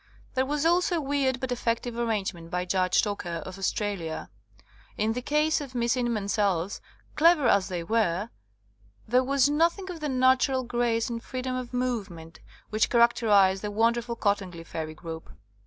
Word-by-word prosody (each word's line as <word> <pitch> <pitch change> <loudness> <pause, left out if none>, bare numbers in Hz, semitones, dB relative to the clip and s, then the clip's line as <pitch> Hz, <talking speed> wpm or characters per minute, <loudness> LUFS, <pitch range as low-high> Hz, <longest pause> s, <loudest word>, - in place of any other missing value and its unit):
There 260 0 +1
was 295 +2 -1
also 350 +1 +3
a - - +1
weird 270 -2 0
but 260 -1 -4
effective 235 0 -1
ar 235 0 -1
rangement 190 -6 -3
by 180 +1 -2
Judge 185 0 +2
Docker, 175 -5 -3
of 185 +1 -8
Australia. 195 -5 -3 0.7
In 215 +1 +1
the 250 - -3
case 300 +4 +1
of 265 -3 -8
Miss 235 0 +1
Inman 235 -5 -1
's 200 - -1
elves, 195 -2 0 0.3
clever 320 -4 +5
as 200 -3 +3
they 175 -2 -4
were, 210 +1 0 0.8
there 250 +3 +3
was 275 +1 +3
nothing 340 +6 +1
of 340 - -8
the 300 -1 -3
natural 260 0 +3
grace 240 -1 0
and 235 -2 -4
freedom 255 0 -4
of 255 -1 -5
movement 205 -10 -4 0.3
which 215 +1 +2
char 235 -1 +6
acterize 200 -5 +3
the 210 - -3
wonderful 235 +3 +1
Cottingley 195 -6 -1
fairy 155 -1 -5
group. 160 0 -8
230 Hz, 170 wpm, -27 LUFS, 195-260 Hz, 0.8 s, char